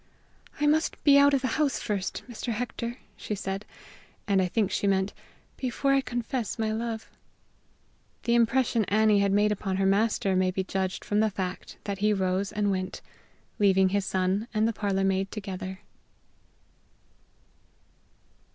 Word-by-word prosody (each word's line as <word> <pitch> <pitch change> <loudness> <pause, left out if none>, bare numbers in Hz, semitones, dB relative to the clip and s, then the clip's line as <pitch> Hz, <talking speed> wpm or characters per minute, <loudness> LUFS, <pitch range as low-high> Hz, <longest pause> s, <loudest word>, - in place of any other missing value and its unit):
"I 295 - +2
must 310 +2 +1
be 280 -1 +7
out 285 0 +6
of 270 - 0
the - - +2
house 285 -4 +2
first, 200 -2 -3
Mr. 240 0 -4
Hector," 235 +1 -4 0.2
she 210 - -4
said 195 +1 -4 0.6
and 195 -2 +3
I 185 - +1
think 205 +1 0
she 200 - 0
meant 190 0 +1 0.4
"before 270 +2 0
I 275 - +4
confess 240 -1 -3
my 220 -1 0
love." 225 0 -3 1.2
The 235 - +1
impression 235 -1 +3
Annie 215 +1 +3
had 200 0 +2
made 205 +1 +3
upon 195 -2 -2
her 195 - +1
master 200 0 +2
may 185 0 +3
be 190 +1 -1
judged 190 0 -3
from 205 - +1
the 220 0 +3
fact 190 -2 -5
that 200 -1 -4
he 210 +1 +3
rose 190 0 0
and 205 -1 0
went, 185 -1 -3 0.6
leaving 190 -2 +4
his 200 +1 0
son 190 +4 0
and 215 +1 +3
the 230 - 0
parlor 200 -2 -1
maid 195 0 +1
together. 190 -2 -6
205 Hz, 160 wpm, -27 LUFS, 190-230 Hz, 1.2 s, be